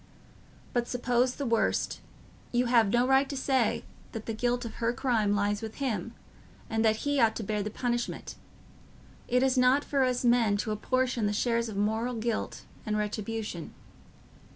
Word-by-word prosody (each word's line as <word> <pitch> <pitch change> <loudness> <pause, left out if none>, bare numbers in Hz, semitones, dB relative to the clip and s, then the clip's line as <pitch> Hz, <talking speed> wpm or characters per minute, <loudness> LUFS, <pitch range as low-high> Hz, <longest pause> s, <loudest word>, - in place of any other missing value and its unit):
But 240 -1 0
suppose 245 0 +1
the 280 - -3
worst: 230 -2 0 0.5
you 245 +1 +2
have 235 -4 +4
no 240 +4 +3
right 270 +1 +4
to 280 - -4
say 260 -3 +1 0.3
that 220 -1 -6
the 225 - -3
guilt 245 +2 0
of 230 - -6
her 230 +1 +2
crime 225 -6 +1
lies 205 0 0
with 220 -1 -6
him, 230 -5 -3 0.6
and 225 0 +1
that 220 -1 +4
he 285 -1 +1
ought 225 -2 +4
to 225 - -4
bear 210 0 -1
the 210 - -3
punishment. 240 +2 -3 0.9
It 250 +1 +2
is 260 -1 +3
not 255 +3 +4
for 275 -2 +1
us 250 -1 0
men 235 -4 +4
to 215 +1 -2
apportion 245 +1 0
the 205 - 0
shares 235 +1 0
of 205 - -6
moral 220 +4 0
guilt 230 0 -3 0.2
and 215 -1 -1
retribution. 210 -4 -4
235 Hz, 175 wpm, -29 LUFS, 215-250 Hz, 0.9 s, have